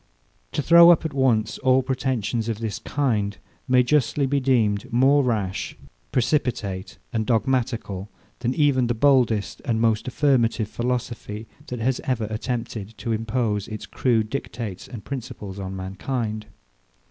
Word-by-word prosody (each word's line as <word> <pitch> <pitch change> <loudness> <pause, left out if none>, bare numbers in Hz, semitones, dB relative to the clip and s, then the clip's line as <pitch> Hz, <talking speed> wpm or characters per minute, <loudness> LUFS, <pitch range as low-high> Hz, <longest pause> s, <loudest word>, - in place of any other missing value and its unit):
To 150 - -1
throw 170 +2 +8
up 170 -1 +5
at 155 - -2
once 125 -6 +1
all 130 0 +3
pretensions 125 -4 -1
of 110 - -1
this 110 -2 -4
kind 110 -8 -1 0.3
may 125 -1 +5
justly 140 +1 +2
be 140 +1 +1
deemed 115 -6 +1
more 135 +4 +4
rash, 105 -7 -2 0.3
precipitate, 115 -8 -1 0.2
and 110 -1 +1
dogmatical, 115 -4 -1 0.3
than 125 +1 -1
even 140 -5 +3
the 120 - 0
boldest 120 -5 +2
and 115 -2 0
most 110 0 +1
affirmative 125 -5 +2
philosophy, 120 -3 -3 0.2
that 125 - -4
has 125 +3 0
ever 125 -4 -1
attempted 110 -2 -4
to 115 - -3
impose 110 -2 -1
its 110 -1 -6
crude 115 -4 0
dictates 115 -7 -5
and 115 -6 -9
principles 105 -7 -6
on 95 0 -5
mankind. 105 +3 -3
120 Hz, 140 wpm, -24 LUFS, 110-130 Hz, 0.3 s, throw